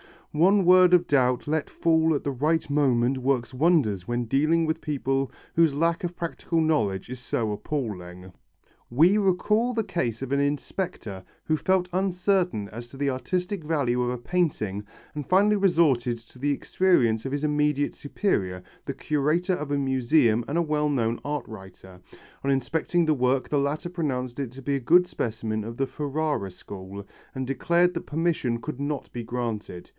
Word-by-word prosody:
One 190 +6 +4
word 180 0 +6
of 175 0 +5
doubt 125 -3 +2
let 155 0 -1
fall 160 -1 +2
at - - -2
the 140 - -1
right 155 +5 0
moment 135 -3 +2
works 130 -2 -1
wonders 125 - +2
when 120 0 -1
dealing 155 +7 +2
with 160 +1 -1
people 135 -3 -1 0.3
whose 165 -4 +4
lack 165 +3 +1
of 175 0 -5
practical 170 -1 -2
knowledge 110 -13 0
is 125 0 -6
so 115 -3 -2
appalling. 95 -7 -5 0.6
We 165 - +4
recall 210 +5 +2
the 225 -2 0
case 150 - -2
of 135 -1 -5
an 140 - +2
inspector 140 - -3 0.2
who 155 - 0
felt 185 +2 +1
uncertain 180 - 0
as 120 +2 -8
to 135 - -12
the 140 0 0
artistic 180 - -2
value 135 -6 0
of 120 - 0
a 125 - -2
painting 120 - -1 0.3
and 150 -3 -6
finally 205 +3 +4
resorted 150 -11 +2
to 115 +2 -18
the 145 +2 +1
experience 135 -8 +2
of 135 - -3
his 145 +1 -2
immediate 150 -1 +1
superior, 95 - -2 0.2
the 140 - -3
curator 155 +6 0
of 150 -4 -5
a 145 - 0
museum 130 -3 +2
and 150 - -1
a - - +3
well 150 -1 0
known 115 -4 0
art 145 -2 -2
writer. 95 -3 -12 0.5
On - - +1
examining 160 +6 0
the 155 - +3
work 130 -1 +1
the 145 - +1
latter 150 +5 -2
pronounced 130 -7 -3
it 135 -4 -3
to 135 - -10
be 140 +2 0
a - - -3
good 175 +8 +5
specimen 110 -4 -3
of 115 +1 -6
the 135 - +1
Ferrara 145 -8 -2
school, 95 +2 -9 0.3
and 130 0 -3
declared 170 +7 +2
that 170 - -5
permission 150 -7 -1
could 150 -1 -6
not 145 0 -3
be 120 - -5
granted. 115 -6 -5
140 Hz, 175 wpm, -26 LUFS, 120-165 Hz, 0.6 s, word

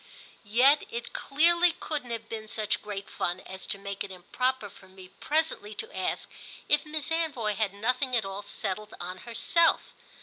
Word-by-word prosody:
Yet 265 +7 +6
it 235 +1 -5
clearly 340 +4 +4
couldn't 295 -7 -4
have 230 -1 -4
been 220 -1 -5
such 215 -1 0
great 200 -2 -5
fun 175 +1 -1
as 190 0 -7
to - - 0
make 200 0 -4
it 200 - -7
improper 240 +6 -1
for 190 -1 -16
me 185 -1 -13
presently 295 -9 -1
to - - -4
ask 185 - -1 0.4
if 295 +1 +3
Miss 310 +1 -1
Anvoy 295 -10 +1
had 210 -1 0
nothing 250 +5 +1
at 225 -4 +2
all 195 +1 -4
settled 210 +1 -4
on 180 +1 -5
herself. 330 +8 +3
220 Hz, 170 wpm, -29 LUFS, 200-285 Hz, 0.4 s, Yet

